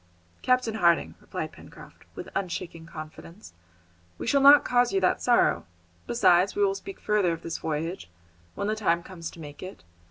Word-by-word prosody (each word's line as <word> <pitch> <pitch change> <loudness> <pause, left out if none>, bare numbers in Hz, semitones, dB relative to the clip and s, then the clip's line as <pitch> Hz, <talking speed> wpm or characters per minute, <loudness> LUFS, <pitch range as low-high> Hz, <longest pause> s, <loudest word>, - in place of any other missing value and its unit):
"Captain 255 -3 +1
Harding," 170 -6 +2
replied - - -5
Pencroft, - - -15
with - - -7
unshaken 170 -3 -5
confidence, 165 - -11 0.6
"we - - -6
shall 280 - +2
not 285 +1 +8
cause 245 0 +2
you 390 - +1
that - - +1
sorrow. - - +2 0.4
Besides, 190 - +3
we 410 0 +3
will 390 - +1
speak 390 0 -9
further 205 -5 +1
of 165 - -8
this 165 - -5
voyage, 160 - -4 0.5
when 200 - -3
the 215 +1 0
time 170 -5 0
comes 170 -3 -8
to - - -14
make 145 -2 -10
it. 185 - -9
185 Hz, 170 wpm, -26 LUFS, 165-240 Hz, 0.6 s, not